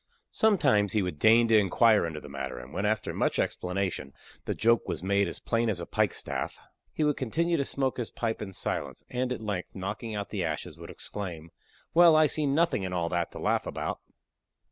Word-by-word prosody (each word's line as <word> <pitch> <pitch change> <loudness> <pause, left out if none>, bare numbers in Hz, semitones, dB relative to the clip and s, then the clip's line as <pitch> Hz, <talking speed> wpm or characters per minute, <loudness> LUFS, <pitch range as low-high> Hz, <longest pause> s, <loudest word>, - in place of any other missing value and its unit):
Sometimes 105 - +3
he 105 -3 +2
would 90 -5 -4
deign 115 +2 +6
to 110 - +6
inquire 105 0 +4
into 80 -2 -5
the 75 - -11
matter, 70 -2 -5
and 60 +2 -10
when, 100 +3 0
after 110 0 -1
much - - 0
explanation, 90 -6 -2 0.3
the - - -2
joke 115 +1 +3
was - - -3
made 100 0 +2
as 85 - -5
plain 115 0 0
as 100 -5 -1
a 85 - -4
pike - - +1
staff, - - -4 0.3
he 155 - -1
would 150 -1 +2
continue 170 +7 0
to 140 - +1
smoke 135 -1 -1
his 120 -3 -3
pipe 115 -1 -3
in 100 -2 -5
silence, - - -4
and 125 0 -1
at 125 - -3
length, 100 -4 -4
knocking 105 +4 -4
out 100 -1 -4
the - - -2
ashes, - - -3
would - - -9
exclaim, 85 -6 -6 0.4
"Well, 170 -1 +7
I 155 0 +6
see 150 0 +1
nothing 160 -3 +2
in 95 -1 -3
all 85 -2 -1
that 85 -1 -1
to - - -8
laugh - - 0
about." - - -3
105 Hz, 210 wpm, -28 LUFS, 90-125 Hz, 0.4 s, Well